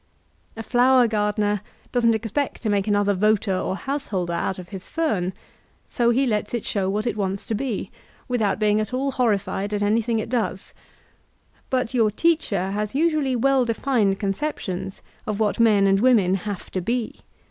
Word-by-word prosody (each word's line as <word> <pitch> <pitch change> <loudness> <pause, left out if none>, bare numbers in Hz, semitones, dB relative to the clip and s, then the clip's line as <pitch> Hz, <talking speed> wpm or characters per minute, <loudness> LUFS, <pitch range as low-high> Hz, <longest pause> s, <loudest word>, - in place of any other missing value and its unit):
A 225 - -5
flower 250 +1 +4
gardener 210 -1 0 0.3
doesn't 230 -2 +3
expect 230 +7 -3
to 215 - 0
make 200 0 0
another 205 -1 +2
voter 205 0 +2
or 185 - -2
householder 200 -9 -3
out 170 +2 -2
of 180 -1 -9
his 190 -3 -8
fern, 210 - -1 0.5
so 235 -1 +1
he 260 +3 +3
lets 210 -1 -1
it 235 - -4
show 195 -2 0
what 210 +2 -1
it 240 - -1
wants 195 -2 -2
to - - -3
be, 225 -1 -3 0.4
without 225 -6 0
being 210 0 +2
at 215 +4 -3
ail 275 +2 0
horrified 210 -4 0
at 205 - -1
anything 225 +2 +1
it 220 - -2
does; 245 -2 -2 1.0
but 255 -2 -1
your 225 -4 +3
teacher 210 - 0
has 210 +3 -3
usually 305 -4 +1
well 270 +2 +3
defined 230 -4 +1
concep 205 +10 -2
tions 190 +1 -6 0.2
of 215 -1 -2
what 215 0 0
men 215 -4 +5
and 195 0 +4
women 215 -6 +4
have 195 0 -4
to 185 - -2
be. 235 +4 -2
215 Hz, 175 wpm, -23 LUFS, 200-245 Hz, 1.0 s, men